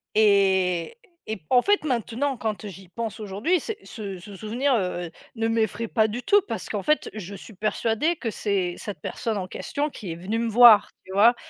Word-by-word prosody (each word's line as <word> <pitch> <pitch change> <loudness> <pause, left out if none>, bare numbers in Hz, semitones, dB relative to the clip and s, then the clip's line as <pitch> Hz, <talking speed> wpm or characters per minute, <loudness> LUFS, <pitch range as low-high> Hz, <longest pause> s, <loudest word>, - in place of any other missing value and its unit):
et 190 - +3 0.3
et 220 -2 -3
en 250 -1 +6
fait, 410 0 +2
maintenant, 255 +1 -1
quand, 220 -2 -3
heu, - - -4
j'y 190 -1 -11
pense 225 +1 -5
aujourd'hui, 215 - 0
c'est 440 +4 -5
ce 200 -5 -7
ce 200 +2 -11
souvenir, 240 +7 0
heu 180 -5 -1
heu, - - -13 0.2
ne 225 0 0
m'effraie 225 0 0
pas 220 0 +2
du 240 +4 -5
tout 410 0 +5
parce - - -4
qu'en - - -3
fait, 305 0 +1
je 200 -2 -7
suis 210 +3 -11
persuadée 225 - 0
que 230 -7 -4
c'est 195 -5 -1
cette 205 - -7
personne 225 -4 -3
en 185 -1 -3
question 290 +9 -3
qui 195 -10 -7
est - - -4
venue 200 +7 -3
me 230 -1 0
voir, 235 -1 +8 0.2
tu 190 - -11
vois? 230 +5 +6
220 Hz, 210 wpm, -25 LUFS, 195-240 Hz, 0.3 s, voir